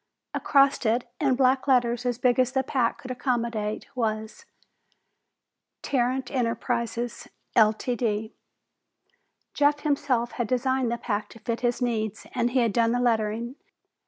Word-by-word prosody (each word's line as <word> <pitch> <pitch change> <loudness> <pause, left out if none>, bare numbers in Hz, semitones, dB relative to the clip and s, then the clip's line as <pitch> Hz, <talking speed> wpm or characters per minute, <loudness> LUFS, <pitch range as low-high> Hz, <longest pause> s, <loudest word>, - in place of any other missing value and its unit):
Across 275 -1 +3
it, 240 +3 +1
in 270 -3 +2
black 260 +1 +2
letters 245 -2 +2
as 245 -2 0
big 250 0 +2
as 255 0 +2
the 265 -1 +1
pack 250 -3 -1
would 255 - -6
accommodate, 235 -4 -2
was: 220 -2 -3 1.4
TARRANT 255 -1 0
ENTERPRISES 235 -1 -2 0.3
Ltd. 220 0 +2 1.2
Jeff 290 0 +2
himself 275 -5 0
had 240 -3 -2
designed 255 0 +1
the 235 - -1
pack 210 -3 -3
to 230 - -13
fit 230 +1 -3
his 245 +1 0
needs, 220 -3 -2
and 240 -2 +1
he 250 +1 +2
had 230 -3 +1
done 230 +1 +3
the 245 - +1
lettering. 230 +1 0
240 Hz, 135 wpm, -26 LUFS, 230-255 Hz, 1.4 s, Across